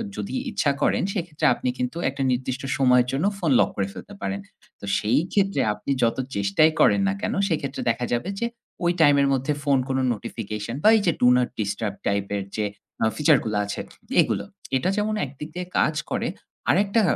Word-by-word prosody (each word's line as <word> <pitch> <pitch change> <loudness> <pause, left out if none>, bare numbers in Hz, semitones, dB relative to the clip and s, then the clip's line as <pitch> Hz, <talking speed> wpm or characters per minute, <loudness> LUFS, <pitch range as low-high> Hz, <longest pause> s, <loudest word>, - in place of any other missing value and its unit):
যদি - - -5 0.2
ইচ্ছা 155 -8 +1
করেন - - +2
সেক্ষেত্রে 170 -6 -3
আপনি 125 - -2
কিন্তু 125 +6 -3
একটা 135 0 -3
নির্দিষ্ট 130 +1 -2
সময়ের 125 -2 +4
জন্য 135 +6 0
ফোন 170 -6 0
লক - - +4
করে 100 -1 -1
ফেলতে 205 - -10
পারেন। 200 0 -2 0.4
তো - - -8
সেই 115 +6 +2
ক্ষেত্রে 195 -1 +2
আপনি 120 - -5
যত 115 - +2 0.2
চেষ্টাই 100 +11 +3
করেন 200 - +5
না 195 - +1
কেন - - -1 0.2
সেক্ষেত্রে 140 -5 -2
দেখা 120 +2 0
যাবে 120 +10 -1
যে 235 - 0 0.4
ওই 175 - +3
টাইম 145 -2 +6
এর 140 - +3
মধ্যে 135 +3 0
ফোন 140 -1 +3
কোনো 130 0 +1
নোটিফিকেশন 110 0 -5
বা 215 - +7
এই - - +1
যে - - +6
ডু 125 - +6
নট 125 -1 +1
ডিস্টার্ব 105 0 -2
টাইপ 100 0 +1
এর 100 - -3
যে 105 - 0 0.4
আ - - +5
ফিচার 150 -1 +5
গুলা 105 -1 0
আছে 100 - -5 0.4
এগুলো। - - -1 0.3
এটা 130 - 0
যেমন 215 +1 0
একদিক 140 +3 -9
দিয়ে 180 0 -3
কাজ 155 - +2 0.2
করে - - 0 0.4
আরেকটা 200 +4 +3
135 Hz, 195 wpm, -24 LUFS, 115-170 Hz, 0.4 s, বা